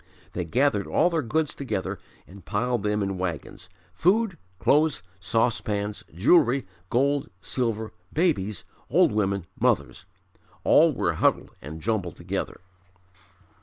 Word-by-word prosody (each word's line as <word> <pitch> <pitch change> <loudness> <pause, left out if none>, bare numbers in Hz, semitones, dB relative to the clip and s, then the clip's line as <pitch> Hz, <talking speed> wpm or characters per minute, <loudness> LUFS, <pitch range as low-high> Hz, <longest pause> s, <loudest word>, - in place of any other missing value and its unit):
They 90 - -2
gathered 120 - +1
all 180 - +3
their 165 -1 +1
goods 150 +3 0
together 125 -9 -3 0.3
and 95 0 -14
piled 115 +5 -1
them 105 0 0
in 95 -1 -3
wagons 90 0 -5 0.2
food, 195 - +2 0.2
clothes, 150 - +2 0.2
saucepans, 105 -1 -1
jewelry, 125 - +4 0.2
gold, 140 +3 +1
silver, 110 0 -2 0.2
babies, 110 - 0 0.3
old - - +4
women, 100 -3 0
mothers, - - +1 0.6
all - - +6
were - - 0
huddled - - +1
and 80 +3 -8
jumbled 100 -7 -1
together. - - -4
110 Hz, 120 wpm, -26 LUFS, 95-140 Hz, 0.6 s, all